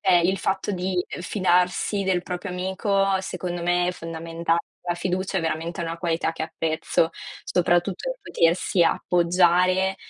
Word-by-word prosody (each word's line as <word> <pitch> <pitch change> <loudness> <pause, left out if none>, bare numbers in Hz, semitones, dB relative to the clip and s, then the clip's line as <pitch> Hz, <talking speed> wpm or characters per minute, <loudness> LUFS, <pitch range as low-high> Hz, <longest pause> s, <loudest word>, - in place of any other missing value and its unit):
Cioè 190 -2 +4
il 190 +3 +1
fatto 190 +2 -1
di 185 -1 -1 0.2
fidarsi 180 +1 +1
del 185 -2 +1
proprio 180 +2 -5
amico 190 +1 0
secondo 175 -2 -4
me 175 0 +2
è - - +2
fondamentale. 165 0 -2 0.3
La 175 - +1
fiducia 185 +2 -2
è 175 - +1
veramente 165 +2 -2
una 165 0 -4
qualità 165 -1 0
che 165 - -5
apprezzo, 160 0 0 0.3
soprattutto 180 - 0
potersi 170 +1 +2
appoggiare 180 +2 +3
180 Hz, 135 wpm, -24 LUFS, 170-190 Hz, 0.3 s, Cioè